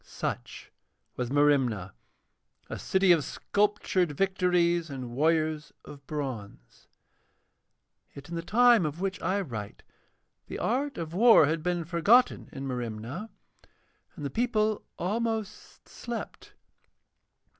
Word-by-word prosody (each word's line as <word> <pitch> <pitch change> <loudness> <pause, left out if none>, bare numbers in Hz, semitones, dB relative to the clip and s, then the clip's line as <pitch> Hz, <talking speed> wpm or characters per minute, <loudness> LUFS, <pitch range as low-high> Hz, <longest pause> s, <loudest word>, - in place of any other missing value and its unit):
Such - - -6 0.4
was 125 -1 -3
Merimna, 135 -9 +2 0.8
a - - -4
city 190 -1 +3
of 165 -4 +4
sculptured 200 -2 0
Victories 175 -1 +1
and 130 -3 -6
warriors 155 +3 0
of 140 -2 -12
bronze. 125 - -6 1.3
Yet 140 0 -10
in 170 - -9
the 165 - -2
time 235 +3 +5
of 150 +3 -6
which 195 0 -3
I 200 +2 0
write 110 - -7 0.6
the - - -6
art 270 +4 -1
of 165 -1 -5
war 225 -3 +7
had 155 +2 -1
been 175 0 -1
forgotten 200 +10 +3
in 135 - -6
Merimna, 125 - -5 0.9
and 145 - -7
the 140 - -3
people 220 - 0
almost 220 +2 -3
slept. 240 -2 -7
170 Hz, 115 wpm, -28 LUFS, 140-205 Hz, 1.3 s, war